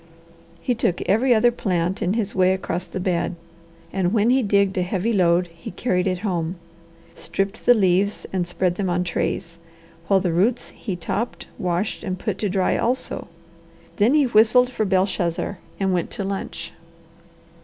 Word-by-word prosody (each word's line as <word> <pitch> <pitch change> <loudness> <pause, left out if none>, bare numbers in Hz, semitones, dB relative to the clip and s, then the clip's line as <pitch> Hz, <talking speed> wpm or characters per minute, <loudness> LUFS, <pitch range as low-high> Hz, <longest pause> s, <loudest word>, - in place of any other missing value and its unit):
He 250 - +1
took 220 -6 0
every 235 +7 +2
other 240 +1 +5
plant 180 -5 -1
in 185 - +1
his 215 -3 -1
way 185 0 +3
across 180 -1 -3
the - - -5
bed, 180 -1 -1 0.6
and 185 -2 +1
when 225 +1 +3
he 265 +1 +4
digged 200 -3 +2
a - - +2
heavy 190 +5 -1
load 180 -2 +3
he 165 - -9
carried 180 -1 0
it 185 -1 0
home, 175 -3 -1 0.6
stripped 195 +5 -4
the 245 - +8
leaves, 195 0 +2
and 180 -2 0
spread 180 0 -1
them 195 -3 -1
on 180 0 +1
trays, 170 -1 -3 0.5
while 195 -1 +4
the 180 -3 -1
roots 205 +8 +1
he 195 -6 -5
topped, 195 +7 -3
washed, 180 +3 -1
and 185 -2 -3
put 195 +1 -3
to 210 - 0
dry 190 -1 +1
also. 250 +2 -2 0.7
Then 230 +8 +4
he 295 -2 +5
whistled 240 +2 +4
for 220 -3 -1
Belshazzar 185 -1 0 0.2
and 190 -1 +1
went 175 -2 0
to 200 - -3
lunch. 195 0 -5
190 Hz, 170 wpm, -23 LUFS, 180-215 Hz, 0.7 s, the